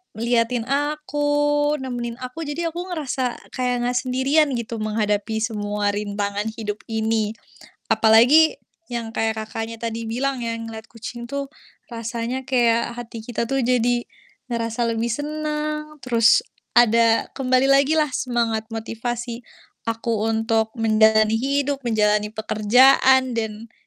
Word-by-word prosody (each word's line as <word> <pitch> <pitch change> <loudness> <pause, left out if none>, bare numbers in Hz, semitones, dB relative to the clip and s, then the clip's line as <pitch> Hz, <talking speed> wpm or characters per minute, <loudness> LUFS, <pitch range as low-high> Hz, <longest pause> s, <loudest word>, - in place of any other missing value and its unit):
ngeliatin 230 +1 +1
aku, 290 0 +1
nemenin 240 -2 -4
aku. 255 +6 -6
Jadi 295 +4 -3
aku 350 +2 -5
ngerasa, 260 -5 -3
kayak 250 -1 0
enggak 245 0 0
sendirian 265 +4 +2
gitu 235 -1 -4
menghadapi 215 0 -1
semua 205 -2 -1
rintangan 205 0 -3
hidup 210 -2 -4
ini. 220 -1 0 0.6
Apalagi, 245 +9 +5 0.3
yang 230 -1 -3
kayak 225 0 0
Kakaknya 225 +1 -5
tadi 230 0 -3
bilang 250 +3 -2
ya, 230 - -2
ngelihat 225 -1 -7
kucing 235 +1 -8
tuh, 280 0 -3 0.4
rasanya 235 +2 -4
kayak 235 -3 +2
hati 230 -1 -8
kita 235 -1 -2
tuh 270 -1 0
jadi, 245 -1 +1 0.5
ngerasa 230 0 -1
lebih 230 +1 -1
senang, 305 +2 -3
terus 230 -3 +4 0.3
ada, 230 -1 +5
kembali 255 -1 +2
lagi 280 +3 +4
lah 300 -4 +1
semangat 230 -3 -1
motivasi 230 +1 -4 0.5
aku 225 -1 -1
untuk 225 0 +1
menjalani 220 -1 +4
hidup, 280 +1 0
menjalani 210 -3 +1
pekerjaan 250 +4 +4
dan 220 0 -4
235 Hz, 125 wpm, -22 LUFS, 220-265 Hz, 0.6 s, Apalagi